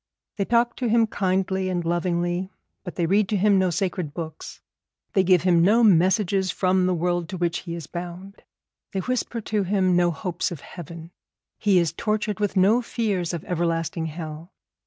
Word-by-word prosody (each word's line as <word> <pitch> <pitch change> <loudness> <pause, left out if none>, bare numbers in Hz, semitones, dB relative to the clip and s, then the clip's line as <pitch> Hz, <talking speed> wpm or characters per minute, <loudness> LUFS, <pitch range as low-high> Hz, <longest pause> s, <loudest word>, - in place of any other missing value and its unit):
They 200 - 0
talk 235 +1 +2
to 250 - -1
him 230 0 +4
kindly 190 -2 -1
and 175 -2 -2
lovingly, 175 +1 -1 0.3
but 180 - -7
they 175 - 0
read 195 +3 +2
to 210 - +1
him 200 0 +4
no 185 -1 +2
sacred 175 -4 -2
books; 160 -2 -7 0.5
they 195 - +4
give 180 -2 +4
him 175 -2 +4
no 215 +7 +4
messages 190 0 +3
from 185 0 +1
the 185 - +2
world 175 0 -1
to 185 - -5
which 175 -1 -1
he 170 -2 -6
is 170 - -7
bound; 180 +3 -8 0.5
they 190 - -1
whisper 245 0 -2
to 210 0 -1
him 190 -1 +1
no 175 0 +3
hopes 170 +2 -2
of 165 -5 -8
heaven. 170 -1 -10 0.5
He 200 -3 +3
is 170 -2 +2
tortured 215 +1 -2
with 205 -1 -1
no 205 +6 +4
fears 205 -8 -2
of 170 -3 -5
everlasting 165 -1 -1
hell. 160 +2 -7
185 Hz, 180 wpm, -24 LUFS, 170-200 Hz, 0.5 s, him